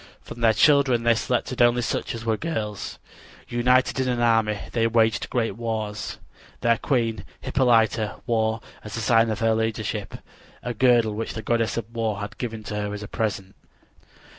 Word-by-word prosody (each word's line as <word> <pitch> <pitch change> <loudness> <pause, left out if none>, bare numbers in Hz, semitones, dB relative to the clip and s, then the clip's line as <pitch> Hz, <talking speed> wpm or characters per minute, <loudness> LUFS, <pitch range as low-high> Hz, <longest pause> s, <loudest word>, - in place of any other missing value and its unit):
From 120 - -10
their 115 -1 +5
children 135 -3 +4
they 120 0 +5
selected 125 +1 -1
only 120 0 +4
such 115 - -2
as 115 0 -7
were 110 -1 +2
girls. 110 -8 -4 0.5
United 125 +2 +2
in 130 - +1
an 125 -1 0
army, 115 -3 +2
they 115 -1 +2
waged 115 -1 +2
great 115 -5 -1
wars. 110 -2 -4 0.4
Their 115 -1 +3
queen, 115 -4 0 0.2
Hippolyta, 115 -4 +2
wore, 110 -2 0 0.2
as 105 +1 -6
a - - -2
sign 115 0 +3
of 110 -1 -3
her 115 0 +3
leadership, 110 -2 -2 0.5
a 120 - -3
girdle 120 -2 +3
which 115 +3 -4
the 110 - -5
goddess 115 -1 0
of 115 - -2
war 110 -3 -1
had 105 0 -7
given 115 -3 -4
her 105 -1 -3
as 105 - -7
a - - -6
present. 100 -4 -3
115 Hz, 170 wpm, -24 LUFS, 110-120 Hz, 0.5 s, their